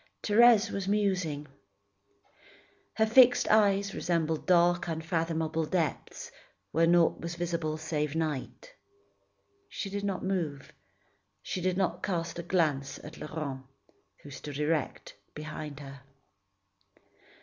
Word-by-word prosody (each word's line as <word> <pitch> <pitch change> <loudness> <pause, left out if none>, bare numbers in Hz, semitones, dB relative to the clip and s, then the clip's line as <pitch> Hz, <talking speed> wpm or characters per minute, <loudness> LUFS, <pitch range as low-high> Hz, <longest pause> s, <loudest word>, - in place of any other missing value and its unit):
Thérèse 225 0 +5
was 195 -1 -3
musing. 185 -8 0 1.5
Her 220 - +3
fixed 245 +2 +6
eyes 200 -2 +3
resembled 160 -3 -1
dark, 175 -1 +3
unfathomable 165 -1 -1
depths, 160 -7 -3 0.4
where 165 +1 +3
naught 170 -1 +3
was 170 0 -5
visible 170 -3 -2
save 150 -1 -2
night. 160 - -4 1.0
She 195 - -5
did 200 0 -3
not 195 -2 -2
move, 165 -8 -3 0.7
she 185 - -4
did 185 0 0
not 180 -2 0
cast 170 -3 -3
a - - -1
glance 150 -6 0
at 155 - -10
Laurent, 150 -4 -5 0.6
who 145 - -11
stood 140 +1 -7
erect 150 -1 -2 0.2
behind 150 -1 -7
her. 135 -1 -10
165 Hz, 115 wpm, -29 LUFS, 150-190 Hz, 1.5 s, fixed